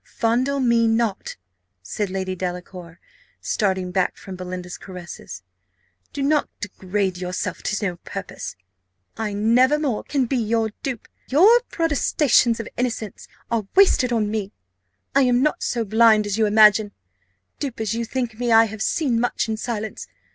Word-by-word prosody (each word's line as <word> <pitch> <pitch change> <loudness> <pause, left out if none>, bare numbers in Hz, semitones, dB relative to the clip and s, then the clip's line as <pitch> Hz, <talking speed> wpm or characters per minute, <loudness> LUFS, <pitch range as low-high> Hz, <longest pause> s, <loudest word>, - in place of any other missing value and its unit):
"Fondle 250 +5 +1
me 235 -3 +3
not," 225 -3 -1 0.5
said 200 - -3
Lady 190 0 -3
Delacour, 180 -1 -6 0.4
starting 190 -4 -1
back 185 0 0
from 190 - -9
Belinda's 180 0 -7
caresses: 180 - -9 0.7
"do 280 - -3
not 295 +1 +2
degrade 195 -1 -2
yourself 180 0 -4
to 210 0 -2
no 180 -3 -2
purpose - - -7 0.6
I 220 -2 -3
never 240 +7 +3
more 280 -8 -2
can 275 -3 0
be 260 +2 -1
your 225 -1 0
dupe. 255 -5 -5 0.2
Your 405 - +6
protestations 285 -7 +2
of 225 - -5
innocence 235 -4 -3 0.2
are 225 -4 -1
wasted 370 -10 +5
on 215 -3 0
me 210 -2 -3 0.6
I 275 - +4
am 250 -1 +3
not 300 - 0
so 235 -2 -1
blind 220 0 +4
as 205 -1 -1
you 220 -1 +2
imagine 210 0 +5 0.7
dupe 270 -6 -4
as 220 0 -1
you 230 +1 -2
think 235 -2 -4
me, 240 -1 0
I 225 0 +7
have 220 0 -7
seen 255 -2 +1
much 245 -1 0
in 220 - -1
silence. 220 -1 -5
220 Hz, 155 wpm, -22 LUFS, 195-245 Hz, 0.7 s, I